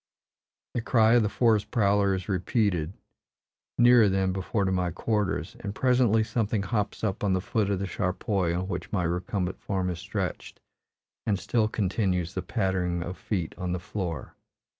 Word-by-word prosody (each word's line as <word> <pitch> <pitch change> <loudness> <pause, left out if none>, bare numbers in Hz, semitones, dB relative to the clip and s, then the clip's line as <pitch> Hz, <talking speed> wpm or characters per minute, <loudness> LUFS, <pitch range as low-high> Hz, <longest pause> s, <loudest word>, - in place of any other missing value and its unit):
The 120 - -1
cry 115 -1 +4
of 120 - +6
the 105 - +1
forest 110 -3 +2
prowler 100 -3 +3
is 95 - -5
repeated, 95 -3 0 0.8
nearer 120 -3 +6
than 95 -1 +1
before 95 +2 -1
to 95 - +1
my 90 -1 +1
quarters, 100 -1 -1
and 100 0 -5
presently 125 -3 +3
something 110 -2 -1
hops 105 -1 -2
up 95 -2 -1
on 100 -2 +2
the 95 - +2
foot 100 +2 0
of 100 - +1
the 100 - -2
charpoy 95 -1 -1
on 95 +1 -2
which 90 -2 -5
my 95 -4 0
recumbent 90 +2 -2
form 95 -2 -1
is 85 - -5
stretched; - - -4 0.7
and 105 -2 +2
still 110 +2 +1
continues 95 -5 -1
the - - -2
pattering 90 -2 -1
of 90 +1 -5
feet 100 -7 -3
on 90 -1 -2
the 90 - -2
floor. 90 -3 -5
100 Hz, 170 wpm, -27 LUFS, 90-110 Hz, 0.8 s, of